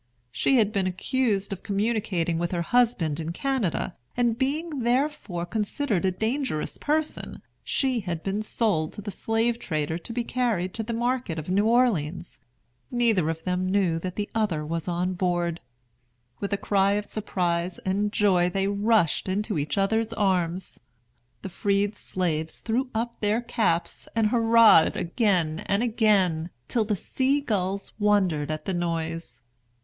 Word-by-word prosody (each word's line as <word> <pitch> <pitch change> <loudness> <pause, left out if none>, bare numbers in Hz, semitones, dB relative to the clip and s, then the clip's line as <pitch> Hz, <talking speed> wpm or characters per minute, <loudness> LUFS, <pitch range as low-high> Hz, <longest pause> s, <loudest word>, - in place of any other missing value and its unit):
She 130 - +2
had 215 -3 +3
been 195 -2 +1
accused 200 +1 0
of 185 - -8
communicating 200 -5 0
with 175 0 -1
her 170 -1 0
husband 195 -9 +2
in 165 0 -3
Canada, 240 - -1 0.2
and 240 -2 +2
being 290 +4 -2
therefore 240 - 0
considered 210 +1 -1
a 190 - +3
dangerous 220 - -2
person, 310 +1 -2 0.2
she 260 -3 0
had 175 -5 -4
been 200 +2 -1
sold 210 -8 0
to - - -8
the 205 - -4
slave 225 +4 0
trader 155 -2 -2
to 205 - -8
be 240 +1 -1
carried 230 -8 -1
to 225 - -3
the 225 +2 -4
market 240 -6 -1
of 160 +3 -4
New 200 +3 +3
Orleans. 190 -9 +1 0.5
Neither 225 -9 +2
of 165 0 -4
them 185 0 -1
knew 185 -4 +2
that 180 +1 -5
the 205 -1 -2
other 195 -9 0
was 165 +2 -3
on 180 +1 0
board. 175 -2 0 0.8
With 200 - -3
a 200 - +1
cry 200 0 +2
of 210 0 -1
surprise 180 -5 -2
and 200 +2 0
joy 185 -4 +3
they 195 +2 0
rushed 200 -3 +2
into 205 -2 -1
each 145 +7 -2
other's 220 +3 +1
arms. 185 -3 0 0.6
The 195 - -4
freed 200 +2 0
slaves 160 -6 -2
threw 250 +3 -1
up 235 +1 -2
their 210 +2 +1
caps 225 -8 -1
and 220 -2 +3
hurrahed 230 -7 +6
again 175 -5 +1
and 200 +3 +2
again, 200 -8 +2 0.2
till 230 -3 +1
the 210 0 0
sea 265 +8 0
gulls 200 -7 -2
wondered 190 -8 +2
at 155 0 -4
the 190 - -1
noise. 165 -7 -3
200 Hz, 155 wpm, -26 LUFS, 175-230 Hz, 0.8 s, hurrahed